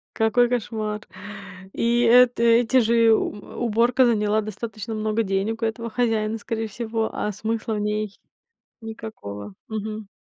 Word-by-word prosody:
Какой 240 Hz, +2 st, +3 dB
кошмар. 220 Hz, -3 st, -2 dB, 0.7 s
И 235 Hz, +1 st, +1 dB
эта 240 Hz, 0 st, +5 dB
эти 235 Hz, +2 st, +4 dB
же, 230 Hz, 0 st, +4 dB
у -, -, 0 dB
э, 205 Hz, -, -12 dB
уборка 240 Hz, +2 st, +3 dB
заняла 215 Hz, -2 st, +2 dB
достаточно 215 Hz, +1 st, -6 dB
много 215 Hz, +1 st, 0 dB
денег 195 Hz, +3 st, -1 dB
у 225 Hz, -, +1 dB
этого 230 Hz, +1 st, -3 dB
хозяина, 225 Hz, -2 st, 0 dB
скорее 225 Hz, 0 st, -3 dB
всего. 225 Hz, +1 st, -2 dB
А 210 Hz, -, -2 dB
смысла 220 Hz, +2 st, -3 dB
в 210 Hz, -, -2 dB
ней 210 Hz, -1 st, -2 dB, 0.6 s
никакого. 105 Hz, -, -8 dB
Мгм. 215 Hz, -1 st, -5 dB
220 Hz, 140 wpm, -23 LUFS, 215-235 Hz, 0.7 s, эта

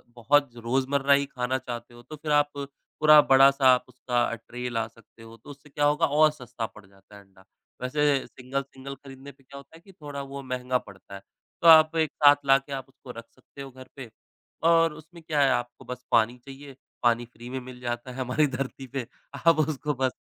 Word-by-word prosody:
बहुत 140 Hz, +4 st, +2 dB
रोज़मर्रा 135 Hz, +4 st, +1 dB
ही 140 Hz, 0 st, +2 dB
खाना 130 Hz, -1 st, -3 dB
चाहते 120 Hz, -1 st, -8 dB
हो 120 Hz, -, -14 dB
तो 155 Hz, -, -10 dB
फिर 150 Hz, 0 st, -5 dB
आप 145 Hz, 0 st, +3 dB
पूरा 150 Hz, +2 st, +3 dB
बड़ा-सा 135 Hz, 0 st, +5 dB
आप 125 Hz, -, 0 dB
उसका 120 Hz, -1 st, -1 dB
ट्रे 120 Hz, +2 st, -8 dB
ला 115 Hz, -1 st, -2 dB
सकते 115 Hz, 0 st, -20 dB
हो। 115 Hz, 0 st, -13 dB
तो 115 Hz, -, -17 dB
उससे 145 Hz, +1 st, -13 dB
क्या 145 Hz, +1 st, -1 dB
होगा 150 Hz, +3 st, +3 dB
और 155 Hz, +1 st, +4 dB
सस्ता 125 Hz, -5 st, -7 dB
पड़ 110 Hz, -2 st, -13 dB
जाता 95 Hz, +1 st, -20 dB
है 100 Hz, -, -13 dB
अंडा। 95 Hz, -1 st, -23 dB, 0.4 s
वैसे 140 Hz, +1 st, +1 dB
सिंगल-सिंगल 135 Hz, +1 st, -7 dB
ख़रीदने 135 Hz, 0 st, -13 dB
पे 135 Hz, 0 st, -27 dB
क्या 140 Hz, +2 st, -13 dB
होता 140 Hz, +3 st, -14 dB
है 165 Hz, -, -16 dB
कि 195 Hz, -, -15 dB
थोड़ा 145 Hz, -5 st, -8 dB
वो 140 Hz, 0 st, -8 dB
महँगा 125 Hz, 0 st, -2 dB
पड़ता 100 Hz, -3 st, -13 dB
है। 95 Hz, -, -10 dB, 0.4 s
तो 170 Hz, -, +3 dB
आप 160 Hz, 0 st, +8 dB
एक 155 Hz, -1 st, +1 dB
साथ 145 Hz, 0 st, +9 dB
लाके 135 Hz, +1 st, +2 dB
आप 135 Hz, -1 st, -5 dB
उसको 135 Hz, -1 st, -13 dB
रख 115 Hz, -, -9 dB
सकते 130 Hz, +2 st, -15 dB
हो 135 Hz, -, -9 dB
घर 130 Hz, 0 st, -13 dB
पे। 130 Hz, -4 st, -9 dB, 0.6 s
और 165 Hz, -1 st, +4 dB
उसमें 165 Hz, +3 st, -14 dB
क्या 155 Hz, -2 st, 0 dB
है 135 Hz, -, +4 dB
आपको 120 Hz, 0 st, -3 dB
बस 125 Hz, 0 st, -8 dB
पानी 115 Hz, +2 st, +3 dB
चाहिए। 135 Hz, 0 st, -11 dB, 0.3 s
पानी 120 Hz, 0 st, +2 dB
फ्री 120 Hz, +2 st, -11 dB
में 130 Hz, +1 st, -4 dB
मिल 125 Hz, 0 st, -11 dB
जाता 120 Hz, +1 st, -5 dB
है -, -, -11 dB
हमारी 130 Hz, +4 st, +1 dB
धरती 135 Hz, 0 st, -5 dB
पे। 130 Hz, 0 st, -5 dB, 0.4 s
आप 165 Hz, -2 st, +6 dB
उसको 150 Hz, -1 st, -1 dB
बस 130 Hz, -1 st, -1 dB
135 Hz, 215 wpm, -26 LUFS, 120-145 Hz, 0.6 s, साथ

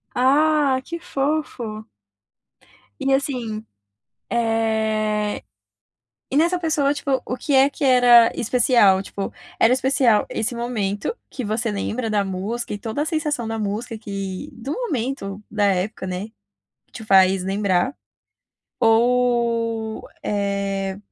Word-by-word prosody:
Ah, 280 Hz, +1 st, +3 dB
que 335 Hz, 0 st, -5 dB
fofo! 270 Hz, -9 st, -3 dB, 1.1 s
E 270 Hz, -, +1 dB
assim. 240 Hz, -6 st, -2 dB, 0.7 s
Eh, 220 Hz, -2 st, 0 dB, 0.9 s
e 270 Hz, -, -1 dB
nessa 345 Hz, +3 st, +3 dB
pessoa, 305 Hz, -4 st, +1 dB
tipo, 270 Hz, -3 st, -1 dB
o 250 Hz, -, -3 dB
que 285 Hz, 0 st, -2 dB
é 270 Hz, +2 st, +5 dB
que 285 Hz, -, -10 dB
era 245 Hz, -3 st, +7 dB
especial? 235 Hz, -5 st, +4 dB
Tipo, 195 Hz, 0 st, -5 dB, 0.3 s
era 230 Hz, -, +5 dB
especial 260 Hz, -4 st, +3 dB
esse 225 Hz, +2 st, -2 dB
momento, 230 Hz, -, -2 dB
que 255 Hz, -, -5 dB
você 220 Hz, +2 st, -1 dB
lembra 220 Hz, +3 st, -2 dB
da 205 Hz, -1 st, +2 dB
música 205 Hz, +5 st, -4 dB
e -, -, -5 dB
toda 225 Hz, +7 st, -3 dB
a -, -, 0 dB
sensação 300 Hz, -8 st, -1 dB
da 225 Hz, 0 st, -3 dB
música, 220 Hz, +3 st, -3 dB
que 195 Hz, -3 st, -5 dB
do 265 Hz, +5 st, -6 dB
momento, 255 Hz, -, -3 dB
da 210 Hz, -1 st, 0 dB
época, 195 Hz, +1 st, 0 dB
né, 185 Hz, +3 st, -4 dB, 0.6 s
que -, -, -39 dB
te 220 Hz, -, -8 dB
faz 190 Hz, -2 st, +4 dB
lembrar? 195 Hz, +4 st, 0 dB, 0.9 s
Ou, 230 Hz, -1 st, +1 dB, 0.2 s
eh, 200 Hz, -1 st, -2 dB
230 Hz, 125 wpm, -22 LUFS, 205-260 Hz, 1.1 s, era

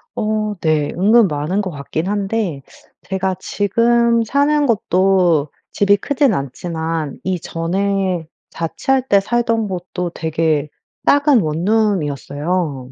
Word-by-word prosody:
어 215 Hz, 0 st, -1 dB
네. 155 Hz, -2 st, +1 dB
은근 210 Hz, +4 st, +5 dB
많은 155 Hz, +7 st, -1 dB
것 185 Hz, -3 st, -4 dB
같긴 155 Hz, +4 st, -4 dB
한데 200 Hz, -6 st, -2 dB, 0.5 s
제가 190 Hz, -1 st, -1 dB
지금 235 Hz, +4 st, +2 dB
사는 285 Hz, +4 st, +2 dB
곳도 185 Hz, -7 st, +2 dB, 0.2 s
집이 200 Hz, 0 st, +3 dB
크진 280 Hz, +1 st, +1 dB
않지만 160 Hz, +2 st, -4 dB
이전에 185 Hz, 0 st, -1 dB, 0.2 s
자취할 260 Hz, +10 st, -1 dB
때 200 Hz, -4 st, +5 dB
살던 230 Hz, 0 st, 0 dB
곳도 180 Hz, -1 st, -4 dB
되게 160 Hz, -2 st, -1 dB, 0.4 s
작은 285 Hz, -4 st, +5 dB
원룸이었어요. 160 Hz, -, -1 dB
190 Hz, 220 characters per minute, -18 LUFS, 160-215 Hz, 0.5 s, 은근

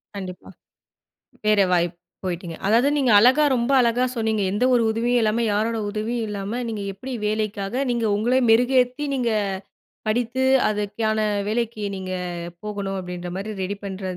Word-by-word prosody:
கண்டிப்பா. 185 Hz, -2 st, -7 dB, 1.0 s
வேற 210 Hz, -1 st, +4 dB
வாய்ப்பு 175 Hz, -1 st, +1 dB, 0.3 s
போய்ட்டீங்க. 175 Hz, -2 st, -4 dB
அதாவது 235 Hz, +6 st, +4 dB
நீங்க 265 Hz, -4 st, +2 dB
அழகா, 260 Hz, +7 st, +5 dB
ரொம்ப 235 Hz, +3 st, 0 dB
அழகா 240 Hz, +1 st, +2 dB
சொன்னீங்க. 220 Hz, -2 st, 0 dB
எந்த 210 Hz, +5 st, +1 dB
ஒரு 235 Hz, -, +4 dB
உதவியும் 240 Hz, +2 st, +1 dB
இல்லாம, 220 Hz, +2 st, +1 dB
யாரோட 225 Hz, +2 st, 0 dB
உதவியும் 225 Hz, +2 st, -2 dB
இல்லாம, 205 Hz, +4 st, -4 dB
நீங்க 215 Hz, -3 st, -4 dB
எப்படி 260 Hz, +6 st, -7 dB
வேலைக்காக 215 Hz, +3 st, -1 dB
நீங்க 235 Hz, -1 st, 0 dB
உங்கள 240 Hz, +5 st, +1 dB
மெருகேத்தி, 250 Hz, +4 st, +3 dB
நீங்க 240 Hz, -3 st, 0 dB, 0.8 s
படித்து 245 Hz, +3 st, 0 dB, 0.2 s
அதுக்கான 215 Hz, +1 st, -1 dB, 0.3 s
வேலைக்கு 225 Hz, -1 st, -2 dB
நீங்க 185 Hz, 0 st, -5 dB, 0.5 s
போகணும். 200 Hz, -2 st, -4 dB
அப்படீன்ற 180 Hz, -1 st, -6 dB
மாரி 205 Hz, +3 st, -4 dB
ரெடி, 200 Hz, +2 st, -3 dB
பண்ற 195 Hz, 0 st, -6 dB
220 Hz, 140 wpm, -23 LUFS, 200-240 Hz, 1.0 s, அழகா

